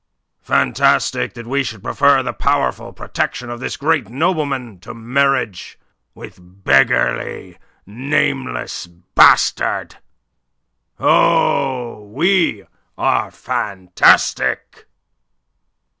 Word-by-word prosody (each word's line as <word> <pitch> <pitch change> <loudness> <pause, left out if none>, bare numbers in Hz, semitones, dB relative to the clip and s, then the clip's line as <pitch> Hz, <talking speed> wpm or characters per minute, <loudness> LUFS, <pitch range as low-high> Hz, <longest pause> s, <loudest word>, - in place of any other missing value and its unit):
"Fantastic 60 - +1
that 120 - -9
we 140 +4 -1
should 110 -6 -7
prefer 140 -2 +2
the 120 - -4
powerful - - -1
protection 125 -1 -4
of 120 - -7
this - - -5
great 145 -6 0
nobleman 135 - -2
to 95 - -11
marriage 125 -3 -1 0.4
with - - -12
a - - -20
beggarly, 90 -6 0 0.3
nameless 135 - -2
bastard. 85 +1 +2 1.0
Oh, 125 -5 +1
we 170 - 0 0.3
are - - 0
fantastic!" 95 -3 0
125 Hz, 85 wpm, -18 LUFS, 100-140 Hz, 1.0 s, prefer